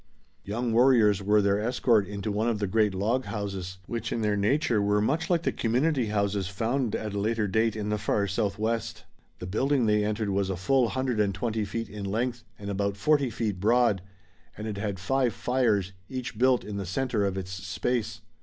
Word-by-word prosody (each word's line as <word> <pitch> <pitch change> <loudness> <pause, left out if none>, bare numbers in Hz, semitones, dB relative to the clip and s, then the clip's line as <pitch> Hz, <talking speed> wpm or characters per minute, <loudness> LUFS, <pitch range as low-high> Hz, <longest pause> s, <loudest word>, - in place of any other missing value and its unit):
Young 115 +3 -2
warriors 115 -5 +5
were 105 +1 +3
their 100 0 +2
escort 110 -2 +2
into 100 +1 -4
one 110 +3 0
of 115 - 0
the 105 - -1
great 105 0 +2
log 115 +7 0
houses, 95 -3 -4
which 115 +1 -4
in 115 - -1
their 105 -1 +2
nature 115 +3 +2
were 105 +1 +2
much 155 - 0
like 170 -2 +2
the - - +1
community 125 +2 +1
houses 100 -2 0
found 115 +5 -1
at 105 -2 -4
a 100 - -2
later 110 +1 0
day 110 +4 +2
in 105 -1 -3
the 105 0 0
far 100 0 +1
southwest. 110 +3 -2 0.3
The - - -7
building 130 +7 +1
they 105 -1 +3
entered 105 0 -1
was 100 0 0
a 95 - -2
full 125 +5 +2
hundred 130 -3 -1
and 100 -2 +1
twenty 110 +1 -1
feet 115 +3 -4
in 105 -1 -7
length 115 +4 -2
and 100 0 -5
about 100 0 -1
forty 140 +5 +2
feet 110 -5 -3
broad, 110 -1 +3 0.6
and 105 - -6
it 105 -2 -4
had 100 -2 -2
five 125 +5 +1
fires, 110 -7 +1 0.2
each 130 -3 -5
built 125 +2 +3
in 105 -1 -6
the 100 - -3
center 115 +2 0
of 95 -1 -1
its 95 -1 -5
space. 100 +5 -2
105 Hz, 200 wpm, -27 LUFS, 100-120 Hz, 0.6 s, warriors